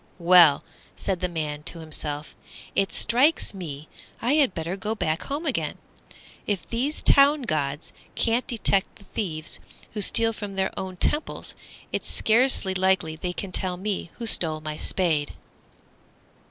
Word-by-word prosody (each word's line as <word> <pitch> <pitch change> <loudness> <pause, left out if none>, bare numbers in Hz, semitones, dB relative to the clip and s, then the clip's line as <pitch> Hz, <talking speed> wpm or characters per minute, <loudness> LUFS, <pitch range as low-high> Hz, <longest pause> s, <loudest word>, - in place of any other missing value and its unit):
"Well," 170 -4 +6 0.3
said 190 -2 -2
the 180 0 -1
Man 150 -3 -3
to 160 - -2
himself, 155 -2 -4 0.4
"it 195 - +1
strikes 255 +4 +2
me 155 -6 -7 0.3
I 240 +4 +1
had 285 -9 +3
better 165 +3 -3
go 210 +3 -3
back 160 -5 -1
home 290 +4 -3
again. 280 - -1 0.7
If 205 -3 -2
these 265 +6 -1
town 285 +1 +6
gods 145 - -2 0.2
can't 235 +2 +1
detect 200 -4 +1
the 200 - -18
thieves 170 -6 -4 0.3
who 210 - -4
steal 225 +2 +2
from 205 -2 -7
their 190 0 0
own 185 -1 -5
temples, 300 - -1 0.4
it's - - -2
scarcely 225 -4 +3
likely 185 -4 +1
they 180 +3 -3
can 185 +1 -6
tell 180 -1 -1
me 195 -2 -3
who 235 - -6
stole 160 -8 +2
my 155 0 -5
Spade." 155 -3 0
190 Hz, 150 wpm, -25 LUFS, 160-225 Hz, 0.7 s, Well